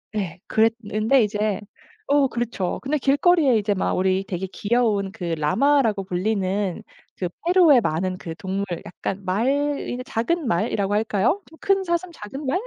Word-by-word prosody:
예. 185 -4 -3
그랬는데 225 +2 +2
이제 210 0 -1 0.5
어 285 -1 +4
그렇죠. 235 -7 -3
근데 285 +3 0
길거리에 285 -1 +3
이제 205 -1 +1
막 190 - -1
우리 190 +1 +1
되게 190 0 -3
귀여운 210 -3 0
그 180 - -9
라마라고 225 - +2
불리는 195 +1 -1 0.3
그 180 -2 -3 0.2
페루의 345 -7 +6
많은 185 +2 -1
그 165 -3 -7
동물 195 +2 -3 0.2
약간 195 +2 -5
말, 195 +6 0 0.4
이 245 - -3
작은 295 +8 -1
말이라고 195 +2 0
할까요? 215 - +1
좀 320 - -17
큰 390 -1 +2
사슴, 345 +1 -1
작은 270 +2 -8
말? 335 +8 +1
215 Hz, 305 characters per minute, -23 LUFS, 190-275 Hz, 0.5 s, 페루의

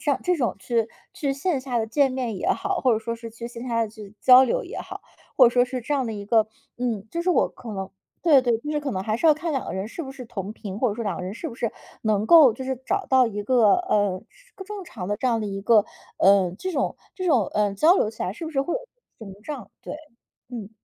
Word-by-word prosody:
像 285 -3 +1
这 360 0 +2
种 240 - -1
去 225 +4 0 0.2
去 300 -7 -2
线 280 0 -1
下 250 -3 -2
的 220 - -1
见 275 +3 +2
面 250 -5 -3
也 - - -2
好， - - -1
或 255 - +3
者 220 - 0
说 230 +1 -4
是 230 0 -8
去 230 +1 -8
线 240 +1 -8
下 230 -1 +1
的 220 - -2
去 210 -1 -12
交 255 0 +9
流 - - -1
也 - - -7
好， - - -8 0.3
或 260 - +8
者 - - +4
说 245 - +4
是 250 0 -4
这 295 - -3
样 265 -4 +1
的 225 - -3
一 200 -1 -6
个， 220 0 +3 0.3
嗯， 225 -4 -2
就 340 - -3
是 360 - -2
我 360 - +4
可 230 - -10
能 190 -1 -5 0.3
对 300 -6 +6
对， 240 -2 +1
就 300 +3 -4
是 295 - 0
可 285 -2 -3
能 185 - -2
还 215 +1 -1
是 330 - +2
要 305 - +7
看 325 +1 -3
两 270 - -2
个 - - -4
人 190 +2 -3
是 330 +9 -6
不 265 - -7
是 265 -2 -9
同 205 -3 -6
频， 200 -2 -7
或 250 - +2
者 205 - -3
说 230 0 -4
两 195 -4 -2
个 - - -5
人 185 +3 -5
是 320 - -5
不 - - -9
是 230 -2 -2 0.3
能 215 -1 +1
够 300 -9 +8
就 260 - -6
是 265 0 -1
找 390 0 0
到 260 -2 +4
一 205 -2 -4
个， 230 -3 +4
呃， 205 - 0 0.4
正 415 -2 -6
常 210 - -7
的 205 - 0
这 255 - 0
样 230 - +2
的 215 - -3
一 195 0 -4
个， 215 0 +4 0.3
呃， 195 -2 +5
这 370 -1 -3
种 275 - -1 0.2
这 370 -2 -4
种， 255 - +4
呃， 205 -1 +1
交 320 - +5
流 215 - +1
起 225 - -7
来 185 - -2
是 325 +9 -7
不 - - -5
是 275 -3 +1
会 345 - -3
有， - - -1 0.4
屏 200 -4 -9
障， 260 -9 -7
对， - - -6 0.5
嗯。 225 -4 -7
235 Hz, 295 characters per minute, -24 LUFS, 210-275 Hz, 0.5 s, 交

